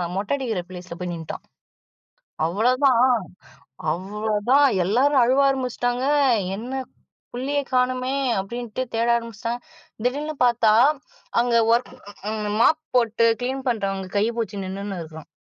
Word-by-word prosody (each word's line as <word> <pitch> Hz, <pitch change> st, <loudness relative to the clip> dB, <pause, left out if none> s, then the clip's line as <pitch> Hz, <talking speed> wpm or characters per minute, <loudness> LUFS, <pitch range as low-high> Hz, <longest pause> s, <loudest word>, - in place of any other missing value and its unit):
மொட்ட 200 Hz, +7 st, -1 dB
அடிக்கிற 230 Hz, -9 st, -2 dB
ப்ளேஸ்ல 180 Hz, -1 st, -8 dB
போய் 180 Hz, -1 st, -4 dB
நின்டான். 165 Hz, -2 st, -7 dB, 1.0 s
அவ்ளோதான், 245 Hz, -, +3 dB, 0.9 s
அவ்வளோதான் 210 Hz, -, +1 dB, 0.2 s
எல்லாரும் 255 Hz, +8 st, +3 dB
அழுவ 260 Hz, +3 st, +3 dB
ஆரம்பிச்சுட்டாங்க, 250 Hz, -1 st, -1 dB, 0.5 s
என்ன, 255 Hz, +5 st, -4 dB, 0.5 s
புள்ளைய 280 Hz, +4 st, -1 dB
காணமே! 255 Hz, +1 st, +1 dB, 0.3 s
அப்பிடின்ட்டு 235 Hz, +4 st, -5 dB
தேட 230 Hz, +1 st, +1 dB
ஆரம்பிச்சிட்டாங்க. 230 Hz, +1 st, -4 dB, 0.4 s
திடீல்னு 290 Hz, +5 st, -1 dB
பார்த்தா, 230 Hz, -3 st, +3 dB, 0.7 s
அங்க 240 Hz, -1 st, +1 dB, 0.2 s
ஒர்க் 240 Hz, +2 st, -1 dB, 0.7 s
மாப் 315 Hz, +6 st, +4 dB
போட்டு 230 Hz, -1 st, +3 dB, 0.2 s
கிளீன் 265 Hz, +2 st, -3 dB
பண்றவங்க 195 Hz, -4 st, -2 dB
கைய 215 Hz, +3 st, +2 dB
புடுச்சு 205 Hz, -4 st, -3 dB
நின்னுன்னு 195 Hz, 0 st, -5 dB
இருக்கான். 160 Hz, -1 st, -11 dB
235 Hz, 110 wpm, -23 LUFS, 200-255 Hz, 1.0 s, மாப்